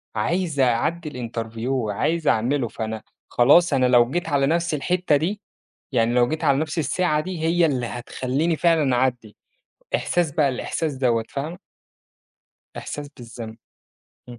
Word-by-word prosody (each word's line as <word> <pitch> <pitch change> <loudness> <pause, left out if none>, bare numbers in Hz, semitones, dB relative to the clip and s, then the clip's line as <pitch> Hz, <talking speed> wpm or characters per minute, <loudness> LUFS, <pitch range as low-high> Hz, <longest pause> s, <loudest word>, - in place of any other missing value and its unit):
عايز 165 - -1
أعدّي 150 +6 +1 0.2
الinterview 115 0 -6
وعايز 135 +6 -1
أعمله، 120 +3 +2
فأنا 110 0 -5 0.3
خلاص 145 +6 +5
أنا 130 -1 +3
لو 120 -1 +5
جيت 175 +4 -2
على 140 -2 +2
نفْس 170 +1 0
الحتة 175 +2 +1
دي، 185 +8 -1 0.5
يعني 120 -2 +2
لو 120 0 +4
جيت 155 +1 -3
على 140 -2 +3
نفْس 155 +2 -2
الساعة 160 0 +1
دي، 185 +1 -5
هي 170 +1 +3
اللي 130 -6 0
هتخلّيني 130 +7 -2
فعلًا 155 -4 +2
أعدّي 125 -4 -1 0.6
إحساس 175 -4 0
بقى 145 -1 +2
الإحساس 150 +4 -2
دوّة، 120 -4 +1
فاهمة؟ 155 +5 -5 1.2
إحساس 145 -1 -6
بالذنب 115 -2 -9 0.7
إمم. 120 -1 -10
140 Hz, 140 wpm, -23 LUFS, 120-165 Hz, 1.2 s, خلاص